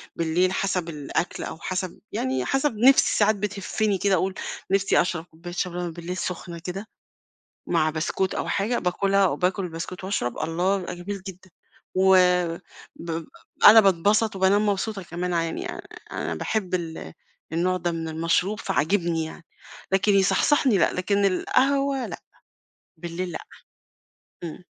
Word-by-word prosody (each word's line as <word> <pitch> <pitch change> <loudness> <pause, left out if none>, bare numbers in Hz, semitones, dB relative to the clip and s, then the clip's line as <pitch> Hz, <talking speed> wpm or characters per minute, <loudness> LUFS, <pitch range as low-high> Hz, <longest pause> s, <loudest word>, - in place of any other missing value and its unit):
بالليل، 170 +3 +1
حسب 185 -3 -1
الأكل 150 +2 -3
أو - - -6
حسب 185 -1 -4
يعني 130 -1 -1
حسب 270 -4 0
نفْسي 265 +5 +5
ساعات 215 0 +4
بتهفني 205 0 -1
كده، 200 +1 +1
أقول: 185 +2 0 0.4
"نفْسي 195 0 +3
أشرب 175 -2 -2
كوباية 175 +1 -10
شاي 180 0 -2
بلبن 175 -1 -3
بالليل 175 +2 -6
سخنة 170 -2 -5
كده، 190 +5 -6 0.8
مع 160 -2 +2
بسكوت 165 +4 -1
أو - - -3
حاجة، 215 +5 0
باكلها 195 +2 +2
وباكل 185 +1 0
بسكوت 175 +3 -7
وأشرب، 190 -11 -2
الله! 175 +5 0
يبقى 180 - -5
جميل 195 +2 -6
جدًا." 185 0 -11 0.4
و 190 0 +5 0.8
ب 165 -1 -5 0.4
أنا 220 +1 +10
باتبسط 200 +3 +2
وبانام 195 +3 +3
مبسوطة 205 0 -1
كمان 175 +1 -3
ع 165 - +2
يعني، 165 - -4
آآ، - - -7 0.3
أنا - - -3
باحب 195 -4 -2
ال 160 - -4 0.4
النوع 180 +3 +1
ده 175 -1 -2
من 165 -1 -4
المشروب، 165 +6 0
فعاجبني 165 +2 0
يعني، 160 +1 -10 0.5
لكن 200 +2 +3
يصحصحني 210 +4 +3
لأ، - - +3
لكن 200 +2 0
القهوة 270 +7 +1
لأ، - - -7 0.8
بالليل 175 +2 -5
لأ، - - -5 1.1
إمم. 170 +2 -8
185 Hz, 145 wpm, -25 LUFS, 170-200 Hz, 1.1 s, أنا